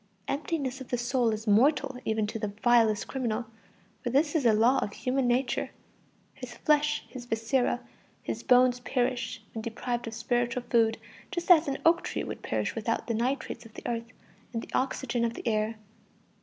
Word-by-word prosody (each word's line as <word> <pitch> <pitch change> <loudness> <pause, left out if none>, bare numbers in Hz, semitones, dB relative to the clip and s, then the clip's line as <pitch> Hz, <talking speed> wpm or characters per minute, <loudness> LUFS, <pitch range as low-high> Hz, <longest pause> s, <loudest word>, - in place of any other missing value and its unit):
Emptiness 275 -2 -2
of 260 - -8
the 245 - -1
soul 240 0 +1
is 220 0 -3
mortal 265 +5 +3
even 220 -1 +1
to 225 +2 -4
the 210 - -1 0.2
vilest 230 -3 +4
criminal, 240 -3 -2 0.6
for 245 - -1
this 290 +4 +2
is 295 -7 +3
a - - +6
law 230 +5 +4
of 205 - -3
human 260 +1 0
nature. 245 0 +1 0.6
His 255 -2 -9
flesh, 300 0 +2
his 250 -2 -9
viscera, 245 +2 0 0.4
his - - -4
bones 250 -1 +5
perish 250 -2 -1
when 225 - -4
deprived 235 +1 -3
of 225 - -5
spiritual 240 +1 0
food, 225 -2 +4 0.3
just 355 -1 0
as 330 -3 +7
an 275 -1 -1
oak 335 +1 +5
tree - - -3
would - - -6
perish - - -1
without - - -1
the 230 - -1
nitrates 250 +4 -2
of 225 -2 -15
the - - -9
earth 230 -1 -2 0.5
and 230 - -2
the - - -12
oxygen 255 -2 0
of 235 0 0
the - - -6
air. 215 0 +1
245 Hz, 185 wpm, -29 LUFS, 230-265 Hz, 0.6 s, as